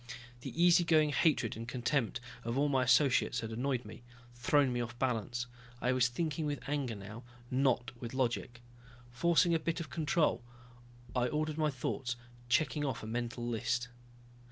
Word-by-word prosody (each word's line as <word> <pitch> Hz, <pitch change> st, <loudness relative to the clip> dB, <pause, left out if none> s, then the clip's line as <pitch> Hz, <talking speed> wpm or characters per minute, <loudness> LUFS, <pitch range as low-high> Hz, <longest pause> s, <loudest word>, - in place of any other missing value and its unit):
The 155 Hz, -, -7 dB
easy 175 Hz, 0 st, +6 dB
going 155 Hz, -3 st, +4 dB
hatred 145 Hz, -7 st, +2 dB
and 115 Hz, +1 st, -6 dB
contempt 125 Hz, 0 st, 0 dB, 0.2 s
of 115 Hz, +2 st, -2 dB
all 145 Hz, +1 st, +3 dB
my 135 Hz, -2 st, +3 dB
associates 130 Hz, +1 st, +3 dB
had 115 Hz, 0 st, -5 dB
annoyed 125 Hz, +1 st, -1 dB
me, 105 Hz, -, -10 dB, 0.3 s
thrown 130 Hz, +2 st, +2 dB
me 120 Hz, -, 0 dB
off 120 Hz, 0 st, -5 dB
balance. 120 Hz, -1 st, -1 dB, 0.3 s
I 125 Hz, -, +1 dB
was 130 Hz, -1 st, +3 dB
thinking 155 Hz, +4 st, -2 dB
with 145 Hz, -1 st, -4 dB
anger 140 Hz, -5 st, -1 dB
now, 105 Hz, +4 st, -9 dB, 0.3 s
not 130 Hz, -3 st, +2 dB
with 120 Hz, +1 st, -5 dB
logic. 120 Hz, -2 st, -1 dB, 0.5 s
Forcing 170 Hz, +6 st, +3 dB
a 165 Hz, -, +3 dB
bit 165 Hz, +2 st, -2 dB
of 155 Hz, -5 st, -6 dB
control, 160 Hz, 0 st, +1 dB, 0.7 s
I 125 Hz, -1 st, +2 dB
ordered 155 Hz, +2 st, -1 dB
my 155 Hz, -1 st, +3 dB
thoughts, 130 Hz, -1 st, -3 dB, 0.3 s
checking 150 Hz, +2 st, +2 dB
off 130 Hz, -6 st, -2 dB
a -, -, -5 dB
mental 120 Hz, +1 st, -3 dB
list. 120 Hz, +1 st, -1 dB
130 Hz, 165 wpm, -33 LUFS, 120-150 Hz, 0.7 s, easy